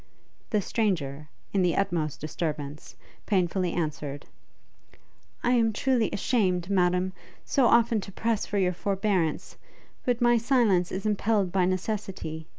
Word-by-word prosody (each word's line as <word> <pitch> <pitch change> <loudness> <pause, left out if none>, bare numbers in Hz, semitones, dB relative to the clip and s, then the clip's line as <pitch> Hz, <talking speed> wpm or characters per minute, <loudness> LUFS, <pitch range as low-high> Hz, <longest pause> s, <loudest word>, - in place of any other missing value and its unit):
The 210 -3 +1
stranger, 155 -11 -1 0.2
in 195 - +3
the 180 -2 +2
utmost 165 -6 -1
disturbance, 150 -2 -5 0.3
painfully 185 -2 +1
answered, 150 -4 -3 1.2
'I 245 - +2
am 230 -3 +3
truly 245 -1 +1
ashamed, 190 -5 0
Madam, 180 0 +2 0.3
so 265 -3 +3
often 235 -2 +4
to 195 - -9
press 225 +2 -1
for 205 - -2
your 185 -2 +2
forbearance, 190 -3 -1 0.5
but 245 -2 0
my 240 -1 +4
silence 220 -8 +2
is 190 +3 -4
impelled 210 -2 +1
by 185 -1 +2
necessity! 185 -4 -3
190 Hz, 130 wpm, -27 LUFS, 170-220 Hz, 1.2 s, often